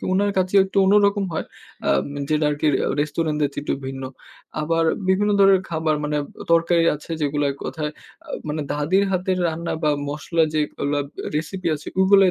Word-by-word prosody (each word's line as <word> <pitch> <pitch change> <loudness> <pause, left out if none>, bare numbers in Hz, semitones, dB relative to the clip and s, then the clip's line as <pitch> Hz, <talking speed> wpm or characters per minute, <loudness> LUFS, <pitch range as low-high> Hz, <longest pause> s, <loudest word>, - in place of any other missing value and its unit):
তো - - -7
উনার 200 +2 +2
কাঁচ্চি 185 +1 0
একটু 190 - -9
অন্যরকম 200 +1 +4
হয়, - - -2 0.4
আম 70 - +3 0.2
যেটা 155 0 +2
আরকি 145 +1 -1 0.2
আ - - +1
রেস্টুরেন্টের 150 0 0
চেয়ে - - -8
একটু - - -1
ভিন্ন। 135 0 -5 0.6
আবার 165 +2 +1 0.2
বিভিন্ন 200 +2 +3
ধরনের 195 -1 +6
খাবার 160 -1 +1
মানে 150 0 -1
আ - - -6 0.3
তরকারি 170 0 +4
আছে 150 - -11
যেগুলা 145 0 0
এক - - -13
কথায় 150 -1 -3 0.4
আ - - -16 0.2
মানে 150 +1 -2
দাদির 165 +7 +2
হাতের 185 0 0
রান্না 165 +1 -3
বা 150 - +3 0.2
মসলা 160 +3 0
যেগুলা 145 -1 -1
আ - - -7
recipe 165 +5 -2
আছে 150 - -9
ওগুলাই 190 0 +6
160 Hz, 180 wpm, -22 LUFS, 150-190 Hz, 0.6 s, ধরনের